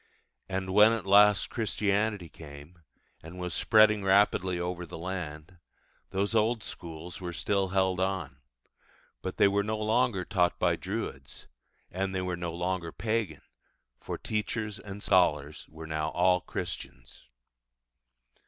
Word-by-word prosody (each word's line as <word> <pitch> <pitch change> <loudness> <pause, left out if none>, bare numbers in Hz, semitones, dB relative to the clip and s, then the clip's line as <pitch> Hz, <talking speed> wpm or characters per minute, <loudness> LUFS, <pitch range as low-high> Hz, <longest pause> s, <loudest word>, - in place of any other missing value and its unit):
And 95 0 -3
when 105 +3 +7
at 115 -4 -3
last 105 +1 +5
Christianity 105 -3 0
came, 75 +2 -13 0.4
and 80 +3 -11
was 90 -1 -4
spreading 110 -2 +4
rapidly 95 -2 +3
over 90 0 -3
the 85 - -8
land, 85 -1 -6 0.5
those 100 +3 -1
old 110 0 +2
schools 85 -1 -8
were 90 -1 -4
still 95 +4 0
held 95 -1 +1
on; 95 -8 -2 0.8
but 95 - -5
they - - +6
were 100 +1 +2
no 110 +2 -2
longer 110 -3 +1
taught 90 -4 +1
by 90 -1 +2
druids, 90 - -6 0.5
and 95 +1 -2
they 95 - 0
were 90 -1 -2
no 85 -1 -4
longer 90 0 -2
pagan, 110 -9 -2 0.6
for - - -5
teachers 105 0 -3
and 100 0 -9
scholars 75 -5 +2
were 80 +1 -10
now 80 0 -2
all 90 +1 +3
Christians. 65 -6 -7
95 Hz, 135 wpm, -29 LUFS, 85-105 Hz, 0.8 s, when